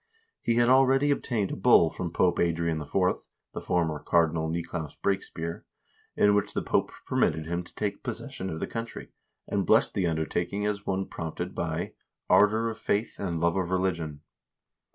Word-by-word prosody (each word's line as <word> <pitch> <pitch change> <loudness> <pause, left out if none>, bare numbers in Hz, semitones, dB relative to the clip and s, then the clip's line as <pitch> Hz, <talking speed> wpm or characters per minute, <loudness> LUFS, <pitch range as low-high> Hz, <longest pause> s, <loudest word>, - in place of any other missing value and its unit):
He 115 - +1
had 120 0 +4
already 135 +2 +5
obtained 115 -8 -1
a - - -2
bull 95 -6 +5
from 85 -2 -4
Pope 90 +1 +2
Adrian 85 -2 0
IV. 75 - -9 0.6
(the - - -5
former 80 -4 0
Cardinal 80 -1 +1
Nicolaus 85 -2 -4
Brakespear), 85 -4 -3 0.5
in 105 0 +4
which 100 -1 0
the - - 0
Pope - - +1
permitted 80 0 +1
him 85 +2 -2
to - - -15
take 105 -1 -2
possession 95 - -5
of 80 - -4
the - - -1
country, 115 0 -6 0.4
and - - 0
blessed - - +3
the 95 -3 +1
undertaking 85 +5 -1
as 105 -1 -2
one 95 0 0
prompted 80 -3 -5
by - - -3 0.4
"ardor 110 +2 +5
of 110 - -10
faith 105 +3 -1
and 85 -4 -2
love 85 +1 +2
of 95 -2 -1
religion." 85 -5 -1
90 Hz, 170 wpm, -28 LUFS, 85-105 Hz, 0.6 s, already